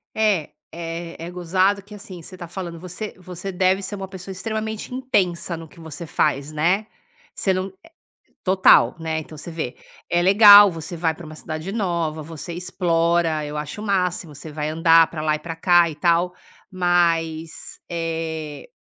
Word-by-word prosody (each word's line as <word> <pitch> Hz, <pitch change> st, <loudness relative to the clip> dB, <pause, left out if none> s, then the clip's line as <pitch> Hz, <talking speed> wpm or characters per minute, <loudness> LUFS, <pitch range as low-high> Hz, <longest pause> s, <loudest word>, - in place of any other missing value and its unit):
É, 210 Hz, -8 st, +1 dB, 0.2 s
é 165 Hz, 0 st, -6 dB
é 175 Hz, -, -7 dB
gozado 185 Hz, +3 st, +1 dB
que, 205 Hz, +2 st, -13 dB
assim, 195 Hz, -4 st, -10 dB
você 185 Hz, +3 st, -11 dB
tá 175 Hz, -2 st, -8 dB
falando 170 Hz, -1 st, -6 dB
você 185 Hz, +5 st, -6 dB
você 185 Hz, +1 st, -7 dB
deve 185 Hz, +1 st, +2 dB
ser 195 Hz, +2 st, -5 dB
uma 195 Hz, -1 st, -6 dB
pessoa 190 Hz, 0 st, -9 dB
extremamente 220 Hz, +4 st, -4 dB
intensa 185 Hz, -10 st, 0 dB
no 165 Hz, 0 st, -9 dB
que 170 Hz, -, -18 dB
você 160 Hz, +1 st, -8 dB
faz, 145 Hz, -2 st, 0 dB
né. 175 Hz, +7 st, +1 dB, 0.5 s
Você 190 Hz, -, 0 dB
não 185 Hz, +1 st, -2 dB, 0.7 s
total, 190 Hz, 0 st, +5 dB
né. 160 Hz, -1 st, -2 dB
Então 155 Hz, 0 st, -10 dB
você 155 Hz, -, -8 dB
vê, 160 Hz, -6 st, -4 dB, 0.3 s
é 175 Hz, -, +2 dB
legal 205 Hz, +1 st, +9 dB
você 165 Hz, +1 st, -7 dB
vai 160 Hz, -1 st, +1 dB
pra 170 Hz, -, -11 dB
uma 155 Hz, 0 st, -10 dB
cidade 155 Hz, +3 st, -6 dB
nova, 170 Hz, -7 st, -1 dB
você 165 Hz, +2 st, -7 dB
explora 170 Hz, -2 st, +1 dB
eu 150 Hz, +1 st, -5 dB
acho 150 Hz, +7 st, -5 dB
o -, -, -6 dB
máximo 180 Hz, -5 st, -1 dB
você 150 Hz, +3 st, -9 dB
vai 150 Hz, 0 st, -3 dB
andar 165 Hz, +1 st, +5 dB
pra 155 Hz, -, -5 dB
lá 155 Hz, 0 st, +1 dB
e -, -, -6 dB
pra 165 Hz, +1 st, -6 dB
cá 175 Hz, 0 st, +4 dB
e 155 Hz, -, -7 dB
tal 170 Hz, +3 st, +2 dB, 0.4 s
mas, 165 Hz, -3 st, 0 dB
eh 160 Hz, -, -4 dB
170 Hz, 175 wpm, -22 LUFS, 160-190 Hz, 0.7 s, legal